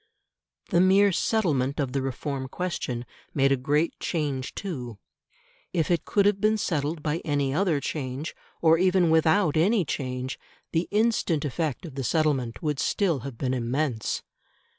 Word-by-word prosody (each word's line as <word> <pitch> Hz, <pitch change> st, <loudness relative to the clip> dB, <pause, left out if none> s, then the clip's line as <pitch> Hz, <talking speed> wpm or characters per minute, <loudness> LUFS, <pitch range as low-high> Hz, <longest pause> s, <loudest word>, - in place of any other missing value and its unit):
The 175 Hz, -, +4 dB
mere 195 Hz, +2 st, +5 dB
settlement 155 Hz, -, +1 dB
of 135 Hz, -3 st, 0 dB
the 135 Hz, +1 st, -1 dB
Reform 135 Hz, +1 st, -3 dB
question 130 Hz, -7 st, -3 dB, 0.3 s
made 135 Hz, -1 st, +3 dB
a -, -, +5 dB
great 145 Hz, +5 st, 0 dB
change 145 Hz, -5 st, -2 dB
too. 125 Hz, -, -5 dB, 0.8 s
If 165 Hz, -2 st, +1 dB
it 170 Hz, -3 st, +1 dB
could 200 Hz, -1 st, +2 dB
have 205 Hz, -1 st, +2 dB
been 215 Hz, +1 st, +3 dB
settled 155 Hz, -4 st, -1 dB
by 155 Hz, +1 st, 0 dB
any 145 Hz, -4 st, 0 dB
other 165 Hz, -2 st, +2 dB
change, 140 Hz, +1 st, -4 dB, 0.3 s
or 165 Hz, 0 st, +6 dB
even 185 Hz, -2 st, +3 dB
without 160 Hz, +1 st, +3 dB
any 190 Hz, +4 st, +3 dB
change, 130 Hz, -2 st, -3 dB, 0.3 s
the 165 Hz, +1 st, 0 dB
instant 210 Hz, -8 st, +1 dB
effect 155 Hz, +3 st, -2 dB
of 155 Hz, -, -8 dB
the 135 Hz, 0 st, -4 dB
settlement 135 Hz, -3 st, 0 dB
would 150 Hz, -3 st, -1 dB
still 170 Hz, +1 st, +1 dB
have 130 Hz, -1 st, -7 dB
been 130 Hz, 0 st, -1 dB
immense. 125 Hz, -1 st, -1 dB
150 Hz, 155 wpm, -26 LUFS, 135-175 Hz, 0.8 s, or